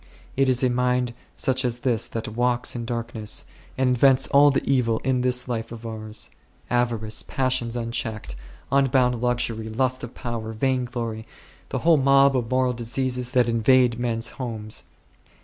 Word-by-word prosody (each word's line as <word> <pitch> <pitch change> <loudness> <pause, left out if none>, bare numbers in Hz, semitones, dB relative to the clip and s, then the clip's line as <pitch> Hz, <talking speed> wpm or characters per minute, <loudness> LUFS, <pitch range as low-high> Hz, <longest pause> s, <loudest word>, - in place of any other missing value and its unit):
It 135 0 +2
is 125 0 +2
a 130 - +4
mind 125 0 +1 0.2
such 130 0 +1
as 120 -1 -2
this 120 -4 +1
that 115 - -5
" 110 - -8
walks 125 0 0
in 120 -1 -4
darkness 115 -2 -3
V' - - -26 0.3
and 130 - +3
invents 130 +1 +5
all 145 +1 +6
the 140 - -1
evil 125 -4 +2
in 130 -1 +1
this 125 0 0
life 115 -2 -3
of 115 0 -9
ours; 110 -1 -4 0.4
avarice, 115 -3 0
passions 130 -3 -1
unchecked, 115 - -3 0.4
un 140 0 +4
bounded 125 -2 +2
luxury, 120 -3 -1
lust 130 +3 -1
of 120 - -8
power, 115 -3 -5
vain 130 +2 0
glory, 115 -2 -5 0.4
the - - -2
whole 165 -2 +6
mob 135 0 +5
of 120 -3 -1
moral 130 -1 +2
diseases 125 +1 -2
that 125 -3 +4
invade 120 +1 +3
men's 115 -1 -1
homes. 110 -3 -5
120 Hz, 170 wpm, -24 LUFS, 115-130 Hz, 0.4 s, all